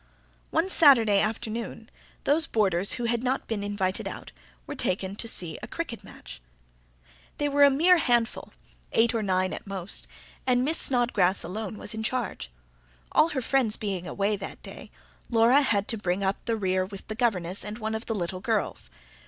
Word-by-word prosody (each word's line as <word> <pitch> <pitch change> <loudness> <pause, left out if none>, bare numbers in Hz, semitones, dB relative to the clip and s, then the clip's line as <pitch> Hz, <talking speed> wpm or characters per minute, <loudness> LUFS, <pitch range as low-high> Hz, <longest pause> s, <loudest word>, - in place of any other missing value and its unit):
One 335 - +1
Saturday 240 - +5
afternoon, 225 +1 -3 0.4
those 300 +2 +2
boarders 195 -3 +2
who 245 - -3
had 235 0 0
not 260 +1 -1
been 215 -3 -3
invited 200 -2 -2
out - - -8 0.3
were - - -6
taken 195 -7 0
to 230 - -3
see 170 -7 +3
a - - -7
cricket 330 -9 -5
match. - - -12 1.0
They 290 - 0
were 285 0 +4
a 285 - +8
mere 335 +6 +5
handful, 240 -5 +1 0.4
eight 230 +1 +3
or 225 - 0
nine 185 -2 0
at - - -8
most, 195 -1 -5 0.4
and 250 0 +3
Miss 315 +3 +2
Snodgrass 230 -7 +2
alone 215 +2 -5
was - - -8
in 220 - -4
charge. 220 - -3 0.6
All 320 - +4
her 275 -5 -2
friends 250 -3 +1
[P.154] - - -24 0.2
being 180 -1 -7
away 200 +4 0
that 195 - -8
day, - - -10 0.4
Laura 235 +4 +5
had 205 -7 +1
to 225 - -1
bring 185 0 -1
up 195 +1 -1
the 230 -1 0
rear 185 -2 0
with 190 +1 -9
the 215 - -4
governess 200 -6 -1
and 210 +1 -6
one 220 -1 -3
of 220 +1 -5
the 225 - -1
little 185 -1 -3
girls. 220 -2 -2
220 Hz, 185 wpm, -27 LUFS, 195-245 Hz, 1.0 s, a